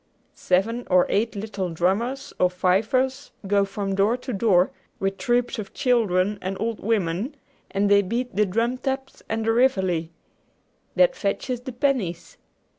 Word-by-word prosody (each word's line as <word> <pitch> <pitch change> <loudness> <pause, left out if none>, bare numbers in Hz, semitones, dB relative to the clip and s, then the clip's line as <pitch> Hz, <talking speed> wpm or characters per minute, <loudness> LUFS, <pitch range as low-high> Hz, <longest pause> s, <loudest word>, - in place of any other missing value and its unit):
Seven 225 +7 0
or 180 -1 +5
eight 220 +2 0
little 200 -3 -3
drummers, 210 - -1
or 180 - +4
fifers, 225 +10 +1 0.2
go 200 0 +3
from 195 0 -3
door 200 +5 +2
to 255 0 -6
door, 190 -3 +3 0.3
with 195 0 -2
troops 240 -1 0
of 200 -2 -7
children 210 -7 +2
and 190 +1 -3
old 225 +1 -2
women, 205 - -1 0.3
and 200 +1 +1
they 200 0 +5
beat 235 +4 -3
the 210 0 +3
drum 230 +6 0
taps 270 0 -4
and 220 0 -1
the 225 - +3
reveille. 190 -9 +2 0.9
That - - +4
fetches 240 +5 -2
the 260 +1 -6
pennies. 240 - -1
210 Hz, 150 wpm, -24 LUFS, 190-245 Hz, 0.9 s, or